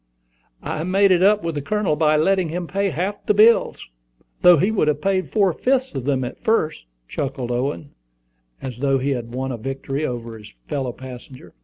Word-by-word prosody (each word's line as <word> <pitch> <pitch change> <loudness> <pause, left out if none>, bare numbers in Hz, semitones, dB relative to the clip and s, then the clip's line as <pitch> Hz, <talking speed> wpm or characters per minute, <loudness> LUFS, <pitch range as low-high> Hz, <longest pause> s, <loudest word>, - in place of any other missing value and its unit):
"I 155 - -3
made 195 +2 +3
it 180 -1 +4
up 205 +2 +4
with 165 -1 -2
the 145 - -3
Colonel 210 -1 0
by 155 0 +3
letting 185 +2 +2
him 175 +2 -3
pay 195 +3 -1
half 185 +6 -3
of - - -38
the 210 - +3
bills, 225 +3 +4 0.6
though 180 -1 +7
he 195 +9 +2
would 170 -8 +2
pay 190 +3 +1
four 195 -2 +1
fifths 260 +7 0
of 130 -2 -4
them 135 -2 0
at 125 - -7
first," 160 - 0 0.2
chuckled 130 - -4
Owen, 140 +4 -3 0.7
as 125 -3 -6
though 135 0 +2
he 135 +2 -1
had 120 -2 -4
won 130 +1 -3
a 120 - -4
victory 135 +4 -4
over 115 -4 -5
his 105 - -13 0.2
fellow 135 -3 -2
passenger. 125 -6 -11
150 Hz, 195 wpm, -21 LUFS, 130-195 Hz, 0.7 s, though